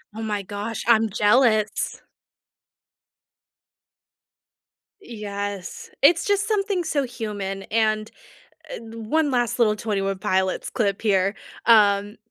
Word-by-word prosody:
Oh 225 - -6
my 210 -2 -2
gosh, 205 +3 -5
I'm 225 -1 +4
jealous. 215 +1 +2 3.0
Yes, 205 - -6
it's 325 +4 +5
just 405 0 +1
something 400 -4 0
so 285 -4 0
human, 205 -5 -5
and, 215 0 0 0.6
uh, - - -5
1 230 +7 -1
last 245 -3 0
little 220 -3 +3
Twenty 210 -2 -2
One 195 0 -2
Pilots 190 0 -1
clip 200 -3 -1
here, 195 -2 +2 0.3
um, 205 -2 +4
215 Hz, 105 wpm, -23 LUFS, 200-240 Hz, 3.0 s, it's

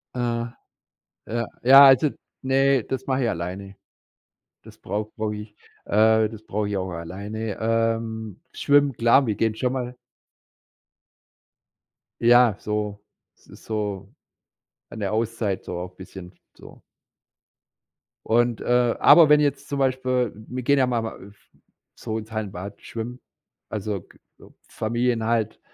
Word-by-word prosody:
Äh. 120 -1 -1 0.8
Ja. 115 +1 -2 0.2
Ja, 135 +3 +9
also 135 +2 +6 0.3
ne, 135 -1 +2
das 130 +2 -5
mache 130 -1 0
ich 120 - +1
alleine. 95 +3 -5 0.9
Das - - -15
brauch 105 +2 -4
brauche 110 -1 -2
ich, 105 0 -10 0.3
äh 110 +1 +4
das 110 0 -11
brauche 105 -1 -2
ich 100 - -2
auch 95 -1 -3
alleine. 100 +6 -6
Ähm, 115 -2 -1
schwimmen, 145 -1 +3
klar, 120 +4 +4
wir 110 - 0
gehen 110 +1 0
schon 125 +2 -1
mal 125 -1 -4 2.3
Ja, 120 -2 +5
so 105 -1 -4 0.3
es - - -28
ist - - -16
so 105 -3 -4 0.8
an - - -9
der 100 0 -2
Auszeit 110 -3 -2
so 90 - -6
auch 90 +1 -8
bisschen 95 -1 -11 0.2
so. - - -15 1.4
Und, 120 0 +1
äh 120 -1 +2
aber 165 -3 +8
wenn 150 0 +6
jetzt 140 -1 -1
zum 140 - -3
Beispiel 130 -2 0 0.2
wir 125 0 -5
gehen 140 +3 +3
ja 130 - +3
mal 120 -2 -1
a 110 - -6
f 100 +1 -17 0.4
so 110 - -5
ins 110 0 -8
Hallenbad 100 -2 -6
schwimmen, 120 +2 -7 0.5
also, 105 -2 -3
k - - -22 0.5
Familien 120 +1 -1
halt, 110 -1 -1
115 Hz, 140 wpm, -24 LUFS, 105-125 Hz, 2.3 s, Ja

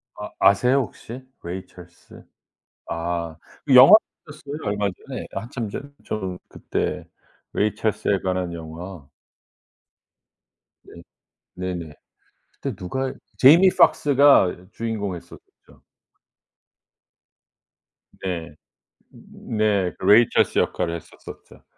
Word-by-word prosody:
아 - - -8
아세요 125 +7 +4
혹시? 125 +1 -8 0.2
Ray 90 +2 -6
Charles. 90 -1 -16 0.7
아 85 -1 -3 0.3
영화도 135 +9 +10 0.3
나왔어요 145 -1 -9
얼마 105 -1 -1 0.2
전에. - - -6
한참 120 -1 -5
전에 135 - -6 0.2
저는 95 -4 -4
그때 - - -4 0.5
Ray 105 +1 +1
Charles에 105 -2 0
관한 90 -2 -2
영화. 85 -1 -9 1.8
네. 85 - -14 0.5
네네. 90 -4 -5 0.6
그때 - - -6
누가 130 +9 -4 0.2
Jamie 165 +8 +7
Foxx가 135 -11 +4
주인공 110 -5 -4
했었죠. 85 - -16 2.4
네. 85 -5 -4 0.6
네. 105 -4 -2
그 - - -7
Ray 115 +3 +7
Charles - - +2
역할을 85 -1 -1
했었었죠. 85 - -13
100 Hz, 260 characters per minute, -23 LUFS, 90-120 Hz, 2.4 s, 영화도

